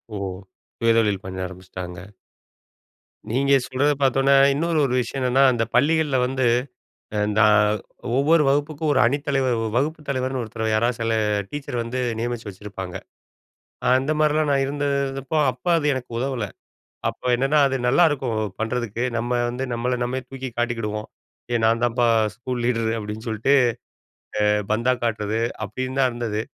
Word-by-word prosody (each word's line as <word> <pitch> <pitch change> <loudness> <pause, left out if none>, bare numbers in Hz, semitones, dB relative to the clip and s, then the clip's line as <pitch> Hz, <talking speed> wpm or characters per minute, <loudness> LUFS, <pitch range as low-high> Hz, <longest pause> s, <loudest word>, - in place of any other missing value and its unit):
ஓஹோ! 100 -1 -3 0.5
சுய 115 -1 +3
தொழில் 105 -4 +1
பண்ண 95 0 -6
ஆரம்பிச்சுட்டாங்க. 90 -1 -8 1.3
நீங்க 140 +3 +2
சொல்றத 145 +3 +1
பாத்தவுன்னே 135 +1 +3 0.2
இன்னொரு 165 +3 0
ஒரு 125 - -1
விஷயம் 125 +3 -3
என்னன்னா, 130 +1 +3
அந்த 120 -2 0
பள்ளிகள்ல 150 +1 +3
வந்து 130 +1 -1 0.7
அ - - +1 0.2
நா 110 - +6 0.7
ஒவ்வொரு 150 +3 +4
வகுப்புக்கும் 145 +2 0
ஒரு 135 - +3
அணித்தலைவர் 135 -1 +1
வ - - -1
வ - - -1
வகுப்பு 155 +4 -1
தலைவர்ன்னு 130 -1 -1
ஒருத்தர் 110 -1 -5
யாரா 115 +2 +3
சில 115 0 0 0.4
டீச்சர் 140 -2 -5
வந்து 115 +2 -4 0.2
நியமிச்சு 120 -1 -3
வச்சிருப்பாங்க. 95 -2 -8 1.0
அந்த 135 +4 +1
மாரிலாம் 155 0 +2
நான் 140 -1 +3
இருந்தப்போ 140 0 -2 0.2
அப்ப 125 +5 -22
அது 150 - -2
எனக்கு 130 -1 -6
உதவல. 130 -3 -2 0.6
அப்ப - - -19
என்னன்னா 135 +4 +2
அது 135 -1 0
நல்லாருக்கும் 135 -4 +3 0.3
பண்றதுக்கு 115 0 -2 0.2
நம்ம 120 +1 -3 0.2
வந்து 130 +2 -3
நம்மள 125 +1 -1
நம்மே 130 +2 -2
தூக்கி 135 -1 -6
காட்டிக்கிடுவோம். 115 -3 -2 0.4
"ஏய் 120 -1 +1
நான் 115 +1 +2
தான்ப்பா 120 0 +2 0.3
ஸ்கூல் 125 +1 -4
லீடரு!" 115 -2 +1
அப்டின்னு 105 +1 -6
சொல்லிட்டு, 110 +5 +2 0.9
அ - - +3 0.3
பந்தா 120 +3 +2
காட்றது 110 -1 -1 0.3
அப்டின்னு 130 +5 -4
தான் 130 - +4
இருந்தது. 115 -3 -2
125 Hz, 145 wpm, -23 LUFS, 115-135 Hz, 1.3 s, நா